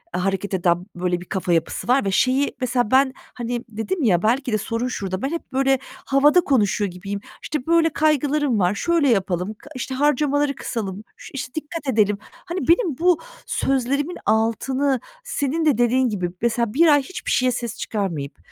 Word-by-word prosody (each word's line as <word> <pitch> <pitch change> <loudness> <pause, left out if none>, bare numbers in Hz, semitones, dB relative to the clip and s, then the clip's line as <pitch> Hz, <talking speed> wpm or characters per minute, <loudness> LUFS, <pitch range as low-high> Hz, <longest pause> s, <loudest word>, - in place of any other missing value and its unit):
hareket 195 +2 -1
eden, 175 -1 +1
böyle, 175 0 -1
bir - - -9
kafa 185 -2 -1
yapısı 165 +6 -1
var 250 -1 +3
ve 195 - 0
şeyi 260 +7 +2
mesela, 245 -3 0
ben, 265 0 +4 0.2
hani, 240 0 -3
dedim 225 - -3
ya, 180 -7 +3
belki 250 +4 +1
de - - +3
sorun 230 +3 -2
şurada, 195 -6 -3
ben 270 - -1
hep 335 -4 -6
böyle 270 0 +2 0.3
havada 295 +6 +5
konuşuyor 210 - +1
gibiyim. 195 +3 -5 0.2
"İşte, 300 -5 -3
böyle 335 0 +4
kaygılarım 295 -4 +1
var, 180 +1 +2
şöyle 335 +3 +2
yapalım, 195 -2 0
kı 270 +6 -16
işte, 260 +1 -4
harcamaları 290 0 +2
kısalım, 205 -6 -4
şu - - -12
işte, 255 -2 -5
dikkat 315 0 -5
edelim." 210 -5 +2 0.3
Hani, 350 +1 -4
benim 335 - +3
bu 350 0 +3 0.3
sözlerimin 275 +5 0
altını, 260 +5 +1 0.2
senin 320 - -1
de 295 -7 +3
dediğin 245 +1 +3
gibi, 185 -5 -2
mesela 235 -1 0
1 330 +4 +5
ay 290 -2 +6
hiçbir 375 - -5
şeye 255 -1 +3
ses 235 -1 -4
çıkarmayıp, 170 -10 -3
250 Hz, 175 wpm, -22 LUFS, 205-285 Hz, 0.3 s, ay